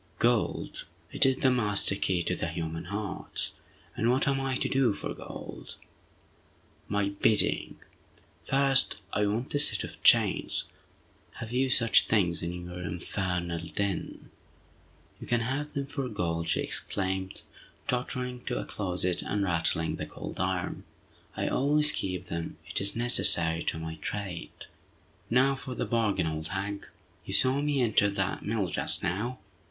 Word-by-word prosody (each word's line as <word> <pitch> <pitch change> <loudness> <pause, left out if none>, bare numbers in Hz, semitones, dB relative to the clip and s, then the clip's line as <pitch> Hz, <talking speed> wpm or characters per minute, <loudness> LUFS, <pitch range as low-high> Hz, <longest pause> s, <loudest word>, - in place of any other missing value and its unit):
"Gold! 120 -1 0 0.3
It - - +5
is 135 - +3
the 130 0 +2
master 105 -5 +3
key 95 -3 0
to 90 -1 -1
human 80 0 -4
hearts! 100 +2 -4 0.4
And 115 - +1
what 130 +4 +2
am 135 0 +1
I 135 -1 -1
to - - 0
do 130 -5 +2
for - - -5
gold?" - - -9 1.1
"My 100 -1 +1
bidding! 100 +2 +1 0.7
First, 135 -3 +3 0.2
I 105 0 +2
want 115 +6 -2
a 145 - +2
set - - +6
of - - -9
chains! - - +4 0.7
Have 115 -1 -7
you 130 +2 +1
such 115 -3 +5
things 90 -6 +2
in 90 +1 -4
your 90 0 -7
infernal 90 0 -3
den?" 100 0 -3 0.9
"You - - -9
can 120 -1 +2
have 140 +5 -3
them 140 -1 -2
for 135 -2 -4
gold!" 85 -5 -2
she - - +2
exclaimed, 95 0 -1 0.4
tottering 125 0 -3
to - - -2
a - - -3
closet, 90 -2 0
and 100 0 -1
rattling 80 -2 0
the - - -4
cold - - -8
iron. 95 -1 -2 0.5
"I - - -1
always 150 +2 +4
keep 90 -1 -3
them—it 85 +1 -5
is 100 0 -1
necessary 85 -9 +4
to - - -1
my 80 0 -6
trade!" 95 +1 -6 0.6
"Now 130 +3 +4
for 130 -1 -6
the - - -2
bargain, 105 -6 +1
old 80 0 -3
hag. 100 +2 -4 0.4
You - - -3
saw 130 +2 +3
me 145 -2 +1
enter 105 -3 +3
that 95 -1 -2
mill 105 -2 -1
just 85 - 0
now? 110 +8 -2
100 Hz, 150 wpm, -29 LUFS, 90-125 Hz, 1.1 s, set